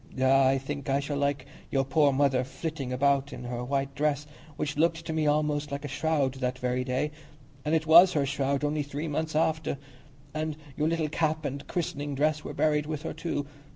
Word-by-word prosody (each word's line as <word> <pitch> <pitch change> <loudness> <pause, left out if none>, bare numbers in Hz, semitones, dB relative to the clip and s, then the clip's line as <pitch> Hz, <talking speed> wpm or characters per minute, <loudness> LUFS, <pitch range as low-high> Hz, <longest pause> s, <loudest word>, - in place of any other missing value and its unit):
"Ah, 135 +1 +5
I 135 +1 +3
think 140 +1 -5
I 135 +1 +3
shall 145 0 -2
see 140 0 +2 0.3
your 135 -1 +1
poor 140 +1 +4
mother 135 -2 +2
flitting 140 0 -5
about 140 +1 +2
in - - -7
her 120 0 -4
white 135 +1 -1
dress, 145 0 0 0.3
which 145 0 -2
looked 165 +1 +1
to 160 - -3
me 155 -1 +1
almost 150 0 +1
like 140 +1 -4
a - - -2
shroud 145 -1 0
that 125 0 -1
very 125 0 -1
day; 130 +4 -1 0.5
and 155 +2 +1
it 160 -1 +1
was 170 +4 +8
her 145 -2 +2
shroud 140 0 0
only 150 +1 +1
three 145 +2 -4
months 155 +1 -2
after; 160 -2 +1 0.6
and 155 -1 -2 0.2
your 150 - +1
little 165 -1 0
cap 155 0 0
and 140 0 -4
christening 145 -4 -3
dress 150 +2 +1
were - - -5
buried 150 -1 +2
with 155 -1 -4
her - - -4
too. 145 -4 -3
145 Hz, 205 wpm, -28 LUFS, 135-155 Hz, 0.6 s, was